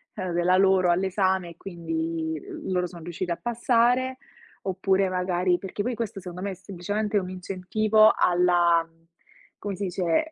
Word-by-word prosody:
ehm, 185 -3 -3
della 175 +2 +3
loro 190 -1 +4
all'esame 190 0 +1
e 170 - -16
quindi 165 -3 -3 0.3
loro 180 -1 0
sono 170 -2 -11
riusciti 175 +1 -4
a 170 - -1
passare, 245 +2 +2 0.5
oppure 190 0 +1
magari 180 -1 +1
perché 195 +1 -4
poi 245 +2 -2
questo 225 -3 -4
secondo 180 -1 -8
me 200 +1 -2
è - - -4
semplicemente 205 +3 -3
un 185 -2 -1
incentivo 200 +4 +3
alla 175 -1 +3
mhmm, 165 0 -30 0.5
come 200 -1 -4
si 200 - -5
dice 180 - 0
185 Hz, 155 wpm, -26 LUFS, 175-205 Hz, 0.5 s, loro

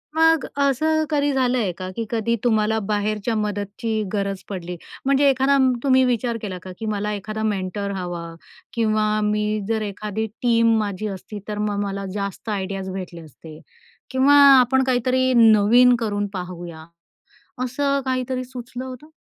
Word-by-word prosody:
मग 325 -2 +4 0.2
असं 310 +3 +2
कधी 290 -1 +1
झालं 255 -1 +1
आहे 205 -6 0
का, 185 -1 -5
की 230 - -3
कधी 230 0 0
तुम्हाला 220 -1 +2
बाहेरच्या 210 +2 -1
मदतीची 210 +1 -2
गरज 195 -2 -2
पडली? 180 -2 -5 0.3
म्हणजे 275 +1 +4
एखादा 270 +1 +3 0.3
तुम्ही 260 -1 +4
विचार 240 -1 0
केला 190 -4 -5
का, 185 - -8
की 225 - -5
मला 210 0 -2
एखादा 215 +2 -5
मेंटर 200 -1 -2
हवा 175 -2 -5 0.5
किंवा 215 -2 +1 0.2
मी 210 0 0
जर 220 -1 0
एखादी 210 +1 -3 0.2
टीम 230 -2 +3
माझी 210 0 -3
असती. 200 +2 -7
तर 210 -1 -4
मग 210 -1 -1
मला 195 0 -4
जास्त 200 +2 -5
आयडियाज 195 -1 -3
भेटले 180 -3 -7
असते 155 +1 -13 0.5
किंवा 265 +2 +4 0.3
आपण 265 +2 +3
काहीतरी 255 0 +1
नवीन 230 +2 +6
करून 205 -2 -1
पाहूया. 175 -3 -7 0.8
असं 280 +2 0
काहीतरी 255 -1 -2
सुचलं 250 0 -8
होतं? 260 +3 -9
215 Hz, 150 wpm, -22 LUFS, 200-255 Hz, 0.8 s, नवीन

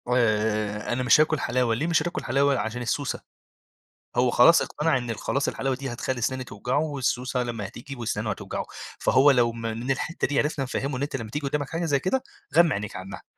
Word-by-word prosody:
آآ 105 -2 +1
أنا 130 +1 -1
مش 125 +4 +6
هاكل 155 -1 +2
حلاوة، 120 -3 +1
ليه 150 +8 -1
مش 165 -2 +3
هتاكل 175 +2 -3
حلاوة؟ 140 +2 +2
عشان 110 +4 -3
السّوسة. 125 +3 -2 1.0
هو 125 0 +4
خلاص 165 +8 +6
اقتنع 150 -2 0
إن 120 -2 -3
خلاص 140 +6 -1
الحلاوة 135 -1 -1
دي، 135 -1 -5
هتخلّي 120 +1 -3
سِنانه 130 +2 -1
توجعه، 125 +3 -2
والسّوسة 130 -4 -1
لمّا 115 -4 -4
هتيجي 135 +7 -9
وسنانه 110 -2 -2
هتوجعه. 100 - -4 0.3
فهو 140 +2 +5
لو 120 -3 +3
م 115 - -8
من 115 +3 -3
الحتة 150 +5 -1
دي، 145 - 0
عرفنا 150 -2 0
نفهّمه، 135 +1 -2
إن 130 - -3
أنت 145 -1 -2
لمّا 115 -4 -6
تيجي 145 +4 -3
قدامك 145 -1 -2
حاجة 165 +1 -2
زي 145 -4 +2
كده، 255 - 0 0.3
غَمّي 170 -1 +6
عنيك 105 0 -4
عنّها. 95 +1 -8
130 Hz, 200 wpm, -26 LUFS, 115-145 Hz, 1.0 s, مش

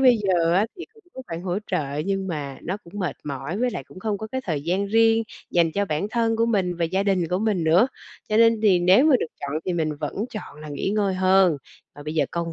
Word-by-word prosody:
bây 255 -2 +6
giờ 175 -4 +2
á 200 +4 +3
thì 355 - -7
cũng 445 - -21
có 260 - -7
khoản 165 +1 -6
hỗ 185 +1 -1
trợ 150 -6 -2
nhưng 195 -1 -1
mà 145 -5 -4
nó 185 +4 -3
cũng 170 - -15
mệt 180 -7 -2
mỏi 140 +7 -4
với 250 0 +1
lại - - -5
cũng 185 - -13
không 205 -1 -2
có 220 - -5
cái 260 +4 -4
thời 150 -5 -2
gian 190 +4 0
riêng 225 +1 +4 0.3
dành 170 -2 +2
cho 200 +3 0
bản 155 +2 -2
thân 225 -1 +1
của 230 +1 +2
mình 185 -6 0
và 170 - 0
gia 190 +4 0
đình 185 -5 +1
của 180 - 0
mình 205 -5 0
nữa. 175 +10 +5 0.4
Cho 215 - +1
nên 230 -1 +5
thì 190 -4 +5
nếu 185 +10 +5
mà 300 -4 +6
được - - -1
chọn 140 - -4
thì 185 - -1
mình 165 -3 0
vẫn 150 - -3 0.2
chọn 215 - -8
là 155 - -8
nghỉ 145 +6 -2
ngơi 205 -3 +1
hơn, 185 -3 +4 0.4
và 145 - -10
bây 155 +2 -5
giờ 155 - +3
công 170 -1 -3
185 Hz, 265 wpm, -24 LUFS, 165-215 Hz, 0.4 s, bây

